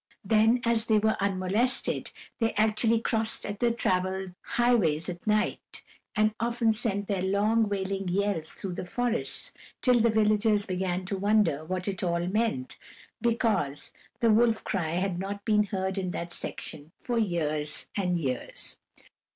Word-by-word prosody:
Then, 225 +4 +4
as 230 -1 +2
they 220 -2 +3
were 220 +1 +2
unmolested, 200 +6 +1 0.3
they 225 -1 +1
actually 220 +2 +2
crossed 225 -1 +1 0.2
the 240 - +3
traveled 190 -4 -1 0.2
highways 200 -11 +3
at 175 +3 -8
night, 210 0 -1 0.3
and 215 0 +3
often 235 -1 +1
sent 205 -3 -1
their 195 -3 -1
long, 210 +3 +2
wailing 195 -1 -2
yells 190 -3 -1
through 190 -2 -6
the - - -5
forests, 240 +6 -2 0.3
until 250 -2 +5
the 235 - +4
villagers 215 -1 +2
began 185 -1 -2
to 195 +1 -3
wonder 205 -7 +2
what 185 +2 -3
it 195 -2 -3
all 170 -1 0
meant, 190 - -1 0.4
because 225 - 0 0.3
the 230 -1 +4
wolf 225 0 +3
cry 165 -5 -2
had 180 0 -1
not 200 +1 -5
been 210 -1 +3
heard 190 -1 -2
in 185 -1 -2
that 170 -1 -5
section 150 +2 -6
for 240 -2 -2
years 155 -7 0
and 180 -3 0
years. 130 -5 -3
200 Hz, 150 wpm, -28 LUFS, 180-225 Hz, 0.4 s, until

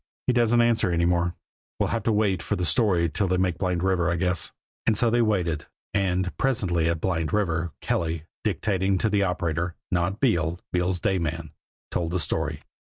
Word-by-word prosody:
"He 125 - +2
doesn't 120 0 +4
answer 115 -4 +2
any 85 0 +2
more. 85 0 +1 0.4
We'll - - 0
have 115 - -1
to 115 - +3
wait 105 -4 +1
for - - -1
the 90 - -1
story 90 0 +3
till 95 +5 -1
they 90 0 +1
make 90 -2 0
Blind 90 -2 0
River, 90 -2 +2
I 85 - +1
guess." 90 0 0 0.4
And 110 -2 +3
so 115 0 +3
they 120 +1 +3
waited. 90 -8 0 0.3
And 95 -2 0
presently 90 -11 +1
at 85 -1 -1
Blind 80 -3 -1
River, 85 -5 0
Kelly, 80 -2 -1 0.2
dictating 95 -1 +1
to 110 +3 0
the 105 -1 +2
operator 85 -2 -1 0.2
not 90 +4 0
Beale, 85 - +1
Beale's 90 0 +1
day 95 +1 +1
man 80 -1 -3 0.4
told 85 -2 -1
the 90 - +1
story. 80 - -1
90 Hz, 190 wpm, -25 LUFS, 85-100 Hz, 0.4 s, doesn't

